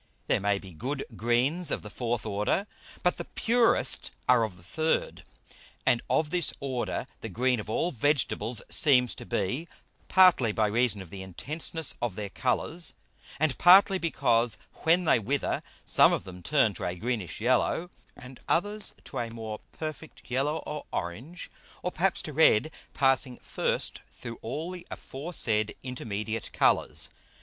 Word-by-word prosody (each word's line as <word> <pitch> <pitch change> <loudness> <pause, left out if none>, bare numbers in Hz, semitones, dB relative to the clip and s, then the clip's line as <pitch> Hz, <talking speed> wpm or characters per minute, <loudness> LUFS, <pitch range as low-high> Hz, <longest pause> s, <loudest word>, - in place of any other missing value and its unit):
There - - +2
may 100 0 +1
be 95 -1 -10
good 130 - -4
Greens 125 +10 +2
of - - -2
the 105 - -8
fourth 120 -1 -2
Order, 105 - 0 0.4
but 180 - +2
the - - -5
purest 235 0 +2 0.2
are 125 -2 +5
of 100 -5 -4
the 85 - -18
third. 155 - -1 0.6
And 120 - +3
of 155 -1 +1
this 175 -4 +1
Order 130 -3 -2
the - - -6
green 125 0 +1
of 105 - -7
all 170 +10 0
Vegetables 125 -3 0
seems 125 -5 +3
to - - -10
be, 125 - -2 0.4
partly 180 - +5
by 110 +1 +1
reason 105 -2 +1
of 85 - -16
the 95 - -7
Intenseness 150 - -2
of 120 -6 -2
their 100 -1 -5
Colours, 160 +7 +1 0.4
and 155 -3 +2
partly 190 +2 +7
because 120 -9 +2 0.2
when 170 +2 +3
they 140 - +4
wither 130 +6 -1 0.2
some - - +6
of - - -1
them 90 -1 -10
turn 130 - +2
to - - -7
a 90 - -2
greenish 110 -1 -3
yellow, 130 +9 +1 0.2
and 125 0 -12
others 205 +4 0
to - - -6
a 120 -1 -2
more 110 -2 -6
perfect 155 0 -7
yellow 140 +5 0
or 150 0 -6
orange, 125 - -5 0.3
or 180 - -1
perhaps 190 +2 0
to 155 - -6
red, 155 -2 +4 0.2
passing 135 -1 +2
first - - -2
through 115 0 -9
all 150 +10 -4
the 180 -1 -9
aforesaid 130 -8 -1
intermediate 110 -3 -4
Colours. - - +2
125 Hz, 160 wpm, -28 LUFS, 110-160 Hz, 0.6 s, partly